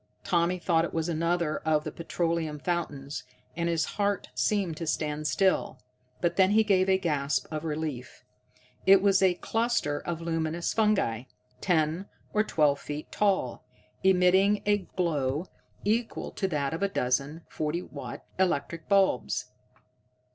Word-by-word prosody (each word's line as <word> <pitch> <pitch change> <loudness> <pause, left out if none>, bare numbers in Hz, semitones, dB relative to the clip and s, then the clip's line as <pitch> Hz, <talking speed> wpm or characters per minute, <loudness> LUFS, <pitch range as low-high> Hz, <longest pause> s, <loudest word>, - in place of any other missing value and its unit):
Tommy 175 +1 +1
thought 170 -2 +2
it 170 - -4
was 160 0 0
another 170 -1 0
of 155 -1 +1
the - - -4
petroleum 165 -2 -2
fountains, 145 -4 -3 0.3
and 170 0 -1
his 165 -1 +1
heart 200 -1 -1
seemed 195 -6 0
to 165 +1 -5
stand 150 -1 -1
still. 190 -6 +1 0.4
But 175 -1 0
then 190 -1 +5
he 220 +2 +5
gave 190 -2 +3
a 190 - +5
gasp 150 -6 0
of 155 0 -3
relief. 150 -5 -5 0.6
It 195 0 +8
was 195 -1 +4
a 185 -2 +4
cluster 225 -10 0
of 170 -2 -4
luminous 165 0 -1
fungi, 195 - +1 0.4
ten 165 +1 +1 0.3
or 215 - +3
twelve 150 -8 +2
feet 150 +1 -6
tall, 195 -12 0 0.4
emitting 190 +2 +4
a 205 0 +3
glow 155 -5 -1 0.4
equal 225 +3 -1
to 195 - -2
that 150 -4 -1
of 165 - -4
a 200 - +2
dozen 140 0 -1
40 155 +3 -2
watt - - -8
electric 165 -2 0
bulbs. 195 -10 +2
170 Hz, 145 wpm, -28 LUFS, 155-190 Hz, 0.6 s, It